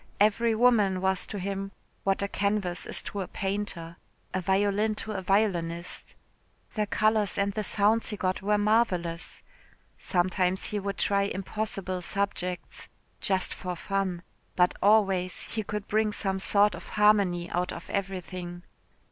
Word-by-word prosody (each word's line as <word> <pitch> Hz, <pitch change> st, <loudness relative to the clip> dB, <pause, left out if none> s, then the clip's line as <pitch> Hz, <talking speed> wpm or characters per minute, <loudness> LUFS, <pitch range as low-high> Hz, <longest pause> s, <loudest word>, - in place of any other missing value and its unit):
Every 220 Hz, +2 st, +3 dB
woman 215 Hz, -5 st, +4 dB
was 190 Hz, 0 st, +1 dB
to 210 Hz, -, -5 dB
him 195 Hz, +1 st, -3 dB, 0.3 s
what 195 Hz, 0 st, +1 dB
a -, -, 0 dB
canvas 200 Hz, -3 st, -1 dB
is -, -, -2 dB
to 200 Hz, -, -4 dB
a 185 Hz, -, -4 dB
painter, 190 Hz, -4 st, -3 dB, 0.4 s
a 185 Hz, -, 0 dB
violin 200 Hz, +3 st, +2 dB
to 215 Hz, -, -4 dB
a 195 Hz, -2 st, -3 dB
violinist. 180 Hz, -3 st, 0 dB, 0.6 s
The 215 Hz, -2 st, 0 dB
colours 215 Hz, -1 st, +2 dB
and 200 Hz, 0 st, +1 dB
the 215 Hz, +1 st, -2 dB
sounds 210 Hz, +3 st, +2 dB
he 210 Hz, -, -3 dB
got 185 Hz, -1 st, -1 dB
were 210 Hz, +2 st, +2 dB
marvellous. 195 Hz, -6 st, 0 dB, 0.6 s
Sometimes 185 Hz, +1 st, +1 dB
he 210 Hz, -, -2 dB
would 200 Hz, 0 st, -3 dB
try 200 Hz, -1 st, +2 dB
impossible 195 Hz, -1 st, -3 dB
subjects 180 Hz, -2 st, -3 dB, 0.6 s
for 180 Hz, -1 st, -5 dB
fun 190 Hz, -1 st, -2 dB, 0.3 s
but 180 Hz, 0 st, +4 dB
always 195 Hz, -3 st, +3 dB
he 220 Hz, -, 0 dB
could 210 Hz, -1 st, -5 dB
bring 215 Hz, 0 st, +2 dB
some 195 Hz, -2 st, -1 dB
sort 205 Hz, +1 st, +4 dB
of -, -, -9 dB
harmony 200 Hz, -5 st, +4 dB
out 180 Hz, +1 st, 0 dB
of 175 Hz, -, -8 dB
everything. 180 Hz, -2 st, -4 dB
195 Hz, 145 wpm, -28 LUFS, 180-210 Hz, 0.6 s, woman